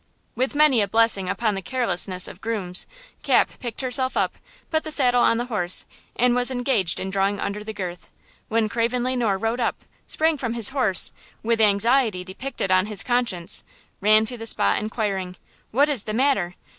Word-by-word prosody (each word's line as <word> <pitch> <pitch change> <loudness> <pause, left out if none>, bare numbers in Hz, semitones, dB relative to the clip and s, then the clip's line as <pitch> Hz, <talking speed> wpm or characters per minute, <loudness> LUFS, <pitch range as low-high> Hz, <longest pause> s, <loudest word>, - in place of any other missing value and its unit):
With 260 +4 -1
many 290 -6 +4
a 200 - +1
blessing 220 -3 +3
upon 220 0 0
the 195 - -4
carelessness 185 -5 0
of 185 - -11
grooms, 195 -5 -1 0.3
Cap - - +2
picked 240 -1 -5
herself 260 0 +1
up, - - +1 0.4
put 315 -1 +1
the 315 - -6
saddle 250 -5 +3
on 230 - +3
the 240 - -2
horse, 185 -7 0 0.3
and 245 +1 +3
was 245 +1 +3
engaged 245 -9 0
in 190 - -4
drawing 200 +1 0
under 210 +1 -4
the 220 - -5
girth 180 -4 -7 0.4
when 225 -1 +1
Craven 235 +3 -1
Le 255 +1 0
Noir 220 -6 0
rode 225 +4 -2
up, 235 - -2 0.2
sprang 315 -1 0
from 235 -3 -3
his 230 -3 +2
horse 255 -9 +3 0.3
and, 225 - -6
with 230 -1 +2
anxiety 215 -1 +2
depicted 195 +2 -4
on 185 +1 +3
his 210 -2 -1
countenance, 240 -9 -1 0.4
ran 215 +2 +5
to 245 +1 -5
the 225 - -3
spot 100 - +2
inquiring: 200 -4 -3 0.3
"What 280 +6 +3
is 275 -8 -1
the 215 - -3
matter? 225 -9 +1
225 Hz, 190 wpm, -23 LUFS, 195-250 Hz, 0.4 s, ran